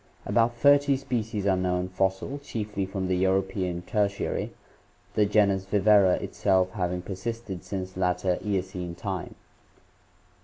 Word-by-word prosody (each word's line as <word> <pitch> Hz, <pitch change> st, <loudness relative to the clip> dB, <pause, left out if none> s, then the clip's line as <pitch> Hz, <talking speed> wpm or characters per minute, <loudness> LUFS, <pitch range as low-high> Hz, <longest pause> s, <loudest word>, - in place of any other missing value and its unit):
About 120 Hz, 0 st, +2 dB
thirty 140 Hz, +2 st, +5 dB
species 115 Hz, -6 st, -3 dB
are 95 Hz, -2 st, +3 dB
known 90 Hz, 0 st, 0 dB
fossil, 95 Hz, +9 st, -1 dB
chiefly 105 Hz, -7 st, -4 dB
from 95 Hz, -1 st, -3 dB
the 90 Hz, 0 st, +1 dB
European 95 Hz, -1 st, 0 dB
Tertiary, 100 Hz, 0 st, -1 dB, 0.6 s
the 105 Hz, -1 st, +3 dB
genus 100 Hz, -2 st, +3 dB
Viverra 100 Hz, -2 st, +5 dB
itself 95 Hz, -2 st, +1 dB
having 90 Hz, -3 st, -2 dB
persisted 100 Hz, 0 st, -5 dB
since 95 Hz, -2 st, -5 dB
latter 90 Hz, 0 st, 0 dB
Eocene 95 Hz, -3 st, -3 dB
time. -, -, -5 dB
95 Hz, 120 wpm, -27 LUFS, 95-105 Hz, 0.6 s, thirty